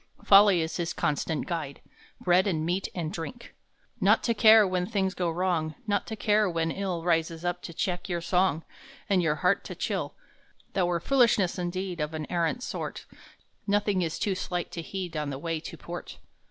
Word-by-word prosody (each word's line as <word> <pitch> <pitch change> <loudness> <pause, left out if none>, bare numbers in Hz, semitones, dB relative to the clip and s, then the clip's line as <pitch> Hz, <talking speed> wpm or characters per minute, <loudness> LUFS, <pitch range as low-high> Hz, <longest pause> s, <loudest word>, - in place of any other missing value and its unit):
Folly 195 -3 +7
is 160 - -4
his 175 -1 -2
constant 150 +1 -1
guide, 160 -6 -4 0.4
Bread 180 +2 +3
and 160 -5 0
meat 180 +3 -1
and 165 -3 -3
drink. 175 +9 -7 0.5
Not 210 +2 +4
to 235 - +2
care 220 -1 +7
when 180 -1 -1
things 195 -4 0
go 180 -3 -1
wrong. 165 -2 -1
Not 205 -2 0
to 220 - -4
care 210 -1 +2
when 165 -1 -1
ill 185 -3 -3
Rises 165 0 0
up 175 0 -1
to - - -7
check 180 +2 -3
your 175 -1 -1
song, 180 -2 +1 0.5
And 190 -2 +4
your 160 -3 +1
heart 180 +2 +3
to - - -6
chill - - -3 0.6
That 185 -2 +2
were 175 -1 0
foolishness 230 -6 +3
indeed 180 -1 -3
Of 150 +1 -3
an 155 -1 -4
arrant 175 +8 0
sort. - - -5 0.6
Nothing 205 -1 +2
is 165 -2 -2
too 200 - 0
slight 180 -2 -3
to 170 - -5
heed 180 0 -5
On 150 -1 -2
the 135 - -4
way 165 +2 -3
to - - -9
port. - - -8
180 Hz, 190 wpm, -28 LUFS, 165-195 Hz, 0.6 s, Folly